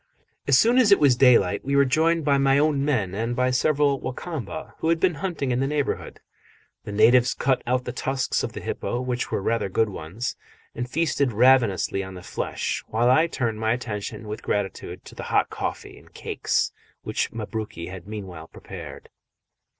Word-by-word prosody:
As 140 -2 +6
soon 240 - +5
as 225 -5 +4
it 200 - +8
was 140 -4 +5
daylight 120 -8 +4
we 140 +1 -1
were 140 0 +5
joined 160 +4 +2
by 140 -2 +3
my 135 0 +4
own 145 -1 +2
men 120 -11 0
and 115 +4 -2
by 125 +1 +1
several 140 +1 +2
Wa 130 - -4
Kamba, 130 - -6
who 160 - 0
had 165 0 +2
been 180 0 +2
hunting 160 -5 -3
in 120 - +1
the 135 - +1
neighbourhood. 145 -1 -2 0.6
The - - -6
natives 120 +4 +4
cut 130 -1 +1
out 125 +1 0
the 125 - -3
tusks 130 +1 -1
of - - -4
the - - -6
hippo, 120 - -3
which 125 -1 -2
were 95 - -2
rather 115 -3 0
good 110 +3 +1
ones, 100 +8 -5 0.4
and 120 +1 -4
feasted 145 -3 +1
ravenously 115 -5 +3
on 95 0 -8
the 90 - -10
flesh, - - -3
while 120 +3 +2
I 160 +6 +4
turned 120 -8 -2
my 110 +1 +1
attention 110 -3 -5
with 105 +1 -5
gratitude 95 -3 -3
to - - -12
the - - -8
hot - - +2
coffee - - -5
and - - -21
cakes - - -1 0.3
which - - -2
Mabruki 110 -5 -5
had 95 0 -9
meanwhile 95 -7 -7
prepared. - - -10
125 Hz, 190 wpm, -24 LUFS, 110-140 Hz, 0.6 s, it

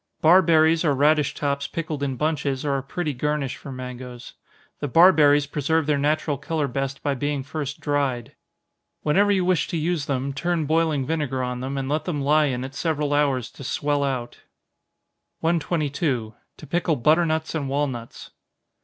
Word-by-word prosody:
Barberries 160 -1 +5
or 145 -4 +2
radish 145 0 +2
tops 140 -1 -1
pickled 155 -3 -4
in 135 -2 -1
bunches, 145 -2 -1
are 140 -1 +1
a - - -5
pretty 150 +3 -3
garnish 145 0 -2
for 140 - -10
mangoes. 125 -1 -8 0.5
The 145 - -2
barberries 150 -2 +6
preserve 150 +2 0
their 145 -1 +1
natural 150 -1 0
color 150 0 -1
best 135 +1 -4
by 145 - +1
being 145 +1 -2
first 140 0 -5
dried. 140 -5 -1 0.7
Whenever 200 +7 +3
you 190 -3 +2
wish 180 -2 +2
to 170 - -3
use 160 -1 -1
them, 135 0 -2
turn 170 +2 -1
boiling 155 -3 +1
vinegar 145 -4 -1
on 125 0 -3
them, 135 +2 -4
and 135 -1 -2
let 150 +3 -1
them 165 -5 -2
lie 150 +2 +3
in 130 -3 -2
it 135 +1 -7
several 150 -1 -1
hours 140 -5 +1
to - - -11
swell 145 +2 0
out. 130 -3 -3 1.0
122. 150 -7 -1 0.2
_To 155 - -12
Pickle 170 -2 0
Butternuts 160 +3 +2
and 145 -4 -2
Walnuts. 135 -4 -4
145 Hz, 165 wpm, -24 LUFS, 135-160 Hz, 1.0 s, barberries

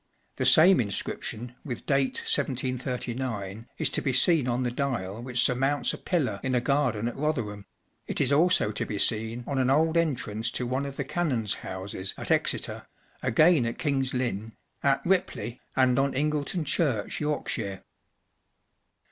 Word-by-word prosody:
The - - 0
same 180 +2 +7
inscription 115 +2 -3
with 125 -5 -6
date 135 -2 +1
1739 125 -4 -2
is - - +2
to - - +1
be 135 - 0
seen 140 +1 +3
on 125 +1 0
the 120 - -1
dial 120 -6 -2
which 125 -1 +1
surmounts 135 +1 +1
a - - -7
pillar 130 - -1
in 130 -1 -1
a - - +4
garden 125 -4 +1
at 120 - -4
Rotherham; 115 -10 -2 0.4
it - - -2
is 140 0 +2
also 160 -7 +3
to - - -2
be 105 - -4
seen 110 +3 0
on 135 +1 -1
an 130 0 +2
old 160 +4 +3
entrance 115 -9 0
to 125 - -2
one 130 +3 -1
of 140 - -7
the 140 - -2
canons 135 - 0
1 - - -12
houses 95 0 -4
at - - -4
Exeter, - - 0 0.3
again 150 +4 +4
at 115 - -4
King's 135 -4 0
Lynn, 115 -3 -2 0.3
at 140 -1 +2
Ripley, 175 -9 -1
and 130 -1 +3
on 135 0 +1
Ingleton 150 +3 -1
Church, 135 -7 0
Yorkshire. 115 -9 -2
130 Hz, 165 wpm, -27 LUFS, 115-140 Hz, 0.4 s, same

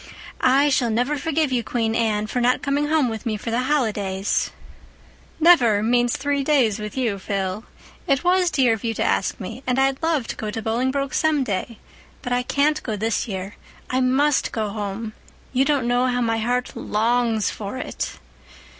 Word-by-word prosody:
I 275 +3 +5
shall 255 -4 +2
never 245 +6 0
forgive 305 0 0
you, 245 -2 0
Queen 225 -2 -1
Anne, 220 -2 +1
for 245 +3 -2
not 250 +1 +2
coming 285 +1 0
home 305 -3 +2
with 220 -2 -4
me 220 -3 -2
for 225 +2 -5
the 235 - +1
holidays." 210 -8 0 0.9
"'Never' 245 -11 +5
means 240 +1 +2
three 285 0 -1
days 255 -8 +2
with 210 +4 -6
you, 225 -6 0
Phil. 195 +2 -3 0.4
It 275 -1 +2
was 360 0 +3
dear 260 -7 +3
of 220 - -5
you 225 -1 -1
to - - 0
ask - - 0
me—and 250 +6 -3
I'd 270 0 +1
love 320 -6 +1
to - - -3
go 215 - -4
to 215 - -4
Bolingbroke 260 +5 -1
some 310 -3 +2
day. 215 +1 -3 0.5
But 245 -3 -2
I 245 - +2
can't 290 +4 +1
go 220 - -3
this 220 +3 -1
year—I 200 +6 -5
must 265 +3 +2
go 215 -2 -2
home. 210 +1 -5 0.4
You 265 +1 +3
don't 275 -4 +1
know 245 +1 +2
how 245 -1 0
my 225 -2 0
heart 245 +3 -1
longs 225 0 +1
for 205 +4 -6
it." - - -5
245 Hz, 180 wpm, -22 LUFS, 220-275 Hz, 0.9 s, I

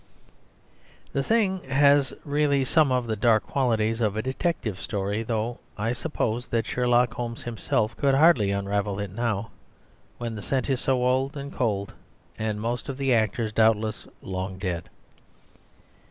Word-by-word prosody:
The 140 - +1
thing 190 +1 +1
has 140 +1 +4
really 145 -2 +2
some 150 +1 +3
of 125 -1 +1
the 110 -1 -1
dark 110 0 +3
qualities 115 -4 0
of 105 -2 +1
a 110 - -1
detective 130 - -2
story; 100 +1 -2
though 115 +1 -2 0.2
I 115 +3 0
suppose 125 -4 -2
that 115 -2 0
Sherlock 125 0 +2
Holmes 115 -1 -5
himself 110 -1 -1
could 140 -1 +3
hardly 140 -9 +5
unravel 100 0 -1
it 100 -2 -4
now, 110 0 -2 0.7
when 120 -1 -4
the 105 - -6
scent 130 +5 -1
is 130 - 0
so 130 -2 +1
old 130 +3 +1
and 140 0 -6
cold 100 -5 -1 0.4
and 110 -1 -2
most 120 +4 -3
of 135 - -4
the 135 -2 +2
actors, 110 0 +1
doubtless, 110 -1 +2 0.2
long 95 0 -4
dead. 90 -3 -3
115 Hz, 155 wpm, -26 LUFS, 105-135 Hz, 0.7 s, hardly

